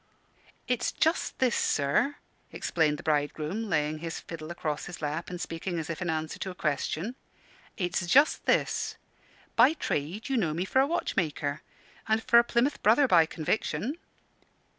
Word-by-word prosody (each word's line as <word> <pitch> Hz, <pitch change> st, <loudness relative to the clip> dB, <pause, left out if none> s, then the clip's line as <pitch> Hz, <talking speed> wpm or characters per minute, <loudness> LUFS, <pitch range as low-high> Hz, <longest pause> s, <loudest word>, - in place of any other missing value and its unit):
"It's 250 Hz, -2 st, 0 dB
just 320 Hz, +2 st, 0 dB
this, 255 Hz, -2 st, +2 dB
sir," 145 Hz, -, +1 dB, 0.4 s
explained 155 Hz, -3 st, 0 dB
the -, -, -10 dB
bridegroom, 155 Hz, +7 st, -1 dB
laying 155 Hz, -1 st, 0 dB
his 165 Hz, 0 st, -5 dB
fiddle 160 Hz, -1 st, -8 dB
across 155 Hz, -3 st, -3 dB
his 175 Hz, -, -8 dB
lap, 155 Hz, +2 st, -3 dB
and 180 Hz, -1 st, -6 dB
speaking 170 Hz, +1 st, -4 dB
as 160 Hz, 0 st, -3 dB
if 165 Hz, -, -6 dB
in 175 Hz, -, -1 dB
answer 160 Hz, 0 st, -2 dB
to 190 Hz, -, -3 dB
a 180 Hz, -, -8 dB
question: 155 Hz, -, -2 dB, 0.6 s
"it's 180 Hz, -2 st, -1 dB
just 285 Hz, -, +4 dB
this: -, -, +1 dB, 0.6 s
by 250 Hz, +6 st, +6 dB
trade 180 Hz, -, -3 dB
you 270 Hz, -, 0 dB
know 160 Hz, -8 st, 0 dB
me 175 Hz, +3 st, -1 dB
for 260 Hz, -, +2 dB
a 270 Hz, -, +4 dB
watchmaker, 155 Hz, -, -1 dB, 0.5 s
and 220 Hz, +1 st, +1 dB
for 235 Hz, -, +6 dB
a -, -, +5 dB
Plymouth 240 Hz, +4 st, 0 dB
Brother 240 Hz, +6 st, +5 dB
by 170 Hz, -7 st, +5 dB
conviction. 215 Hz, -, -2 dB
175 Hz, 160 wpm, -28 LUFS, 155-235 Hz, 0.6 s, by